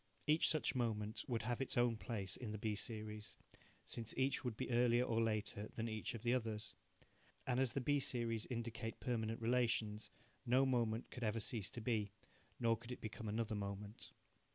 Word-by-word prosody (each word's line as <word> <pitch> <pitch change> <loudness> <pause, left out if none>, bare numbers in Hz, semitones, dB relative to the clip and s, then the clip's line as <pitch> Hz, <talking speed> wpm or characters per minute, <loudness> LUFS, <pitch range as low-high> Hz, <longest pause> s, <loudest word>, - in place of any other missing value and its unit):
Each 155 +1 +5
such 155 -2 +2
moment 110 -3 0
would 120 -3 0
have 120 +2 -1
its 135 - 0
own 120 -1 +4
place 100 -2 -2
in 120 - -5
the 105 - -3
B 105 0 0
series, 105 0 -4 0.5
since 115 -1 -4
each 135 +1 +2
would 120 -4 -2
be - - -2
earlier 120 0 +5
or 115 -2 +2
later 110 -1 0
than 115 0 -1
each 110 +1 -2
of 115 - -7
the 120 0 +3
others. 110 -3 -1 0.7
And 125 -1 +1
as 130 -3 +3
the 135 - 0
B 145 +3 +3
series 115 -4 0
indicate 115 -1 -3
permanent 115 -2 -1
relations, 115 -3 +2 0.3
no 130 +3 +5
moment 120 -3 +1
could 125 - -5
ever 110 +1 +1
cease 105 -2 -2
to 120 - -6
be, 110 -3 +1 0.5
nor 115 -2 +4
could 120 +2 -10
it 125 - -4
become 110 +1 -5
another 110 +1 0
moment. 100 +1 -4
115 Hz, 185 wpm, -40 LUFS, 110-125 Hz, 0.7 s, Each